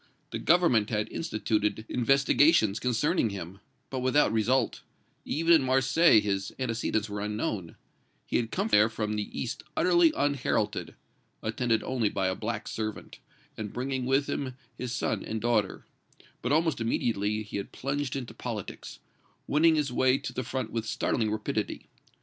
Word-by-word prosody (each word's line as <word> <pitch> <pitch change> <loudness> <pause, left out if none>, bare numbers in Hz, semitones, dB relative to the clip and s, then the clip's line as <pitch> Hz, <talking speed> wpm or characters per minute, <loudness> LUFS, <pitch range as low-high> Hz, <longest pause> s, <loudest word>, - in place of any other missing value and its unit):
The - - -3
Government 155 -11 +3
had 105 -2 -1
instituted 110 -7 -1
investigations 135 -3 +3
concerning 125 +3 +1
him, 95 -1 -7 0.3
but 130 - -2
without 130 -2 +3
result; 115 +3 +1 0.4
even 165 +2 +3
in 160 - +6
Marseilles 135 -1 +4
his 100 -1 -1
antecedents 115 -3 -1
were 100 -1 -5
unknown; 105 -4 -3 0.5
he - - 0
had 115 -2 -1
come 200 - -1
there 105 - +5
from 110 -1 -3
the 105 -1 -4
east - - -4 0.2
utterly 175 -2 +5
unheralded, 140 -2 0 0.5
attended 115 0 0
only 120 -5 0
by 95 -1 -1
a - - 0
black - - -4
servant, 110 -1 -5 0.4
and 105 -2 -6
bringing 130 0 -2
with 135 +2 +2
him 130 -3 -3 0.2
his 125 -1 -5
son 130 - -1
and 110 - -3
daughter, 110 -3 0 0.6
but 125 - -2
almost 160 -4 +2
immediately 110 -2 0
he 105 - -6
had 100 - -5
plunged 140 0 -3
into 130 -3 -5
politics, - - -6 0.5
winning 160 +2 +4
his 145 -5 0
way 130 +1 +3
to - - -6
the - - -2
front 130 -1 -4
with 115 -1 -3
startling 115 0 0
rapidity. 110 0 -3
120 Hz, 155 wpm, -28 LUFS, 110-135 Hz, 0.6 s, in